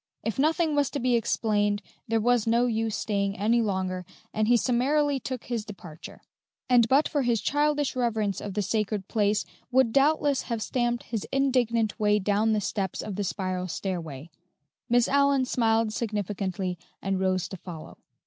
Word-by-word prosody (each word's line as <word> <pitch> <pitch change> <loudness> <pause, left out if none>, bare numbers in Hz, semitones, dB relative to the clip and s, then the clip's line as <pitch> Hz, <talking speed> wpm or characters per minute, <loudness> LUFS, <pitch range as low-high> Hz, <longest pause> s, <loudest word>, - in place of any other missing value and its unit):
If 225 +3 -3
nothing 315 +2 +2
was 285 -2 +2
to 285 - -4
be 245 0 +2
explained, 205 -2 +1 0.2
there 225 0 +1
was 240 0 +2
no 235 +2 +3
use 225 -2 -1
staying 200 -2 -1
any 225 +5 +2
longer, 190 -3 -2 0.3
and 215 0 +1
he 240 +1 +5
summarily 275 +4 +1
took 255 -2 -5
his 235 -3 -3
departure; 175 -7 -11 0.4
and 245 -2 +5
but 280 +3 +4
for 290 - 0
his 240 -3 +1
childish 290 +1 +1
reverence 220 -5 0
for 205 - -5
the 205 +1 -2
sacred 210 -1 -1
place 210 -2 +1 0.2
would 255 -2 +3
doubtless 285 0 +3
have 230 -3 -3
stamped 240 -1 -1
his 225 -4 -4
indignant 245 -5 +1
way 210 -1 +3
down 210 +2 +1
the 210 - +1
steps 195 -2 -3
of 205 - -5
the 205 - -2
spiral 185 -1 -2
stairway. 165 -5 -5 0.6
Miss 240 0 +4
Allyn 280 -1 +3
smiled 225 -3 +1
significantly 195 -5 -3 0.2
and 195 -1 -1
rose 185 -1 0
to 190 - -7
follow. 170 -3 -10
220 Hz, 165 wpm, -27 LUFS, 200-245 Hz, 0.6 s, he